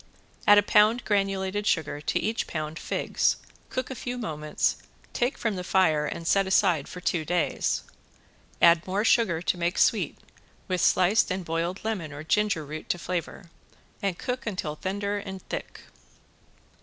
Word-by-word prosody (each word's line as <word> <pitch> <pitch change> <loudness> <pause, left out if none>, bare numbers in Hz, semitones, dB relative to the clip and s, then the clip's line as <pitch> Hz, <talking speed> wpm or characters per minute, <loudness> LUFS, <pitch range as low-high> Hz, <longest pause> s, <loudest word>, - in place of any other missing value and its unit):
Add 205 - +9
a 205 - +6
pound 215 +4 +4
granulated 195 0 0
sugar 150 -3 0
to - - 0
each 225 +2 -1
pound 155 0 -4
figs, - - 0 0.3
cook 255 +1 -3
a - - -2
few 250 0 -5
moments, 155 -9 -1 0.4
take 245 +2 0
from 220 -3 -1
the 180 - -4
fire 160 -6 +2
and 165 - -5
set 195 +3 +3
aside 180 -6 +3
for 180 - -8
two 175 -3 0
days. 175 +2 0 0.8
Add 170 0 +6
more 200 +4 0
sugar 185 -9 +3
to 180 - 0
make 170 +1 0
sweet, - - +2 0.5
with 185 -3 0
sliced 185 +4 +4
and 185 -1 -3
boiled 165 +3 -2
lemon 190 -9 -2
or 145 +1 -7
ginger 205 -2 +1
root 155 +2 -8
to - - +1
flavor, 175 0 -5 0.5
and 195 -3 -1
cook 250 -1 -4
until 175 -7 -3
tender 200 +4 -2
and 190 -2 -8
thick. - - -6
185 Hz, 160 wpm, -27 LUFS, 165-205 Hz, 0.8 s, Add